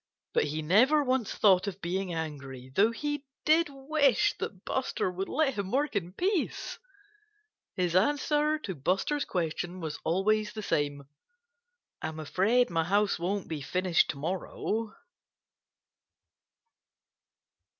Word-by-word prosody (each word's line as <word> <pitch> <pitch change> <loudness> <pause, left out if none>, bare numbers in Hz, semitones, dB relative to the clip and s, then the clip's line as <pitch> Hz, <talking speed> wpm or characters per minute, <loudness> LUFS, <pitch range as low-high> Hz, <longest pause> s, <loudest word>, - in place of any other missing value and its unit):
But - - +3
he 155 +1 -3
never 250 - +5
once 255 -4 0
thought 190 -2 +4
of 195 -1 -4
being 185 +1 -2
angry 140 -6 -6
though 210 +3 +5
he 290 +4 -3 0.2
did 315 +1 +4
wish 275 -1 +2
that 190 -2 -6
Buster 260 -7 -1
would 190 +2 -4
let 280 -1 +1
him 200 -4 -3
work 275 +1 0
in 180 -3 -1
peace. 370 - -1 1.0
His 180 -2 0
answer 295 +8 +2
to 215 -11 -5
Buster's 190 - 0
question 175 +1 -3
was 155 -4 -5
always 210 +5 +1
the 215 -1 -6
same: 145 -5 -1 1.0
"I'm 160 0 -4
afraid 200 +9 +2
my 165 -1 +1
house 200 +1 +2
won't 190 +3 -2
be 155 -3 -4
finished 180 +4 +2
to - - -3
morrow." 190 +7 -3
195 Hz, 130 wpm, -29 LUFS, 170-265 Hz, 1.0 s, never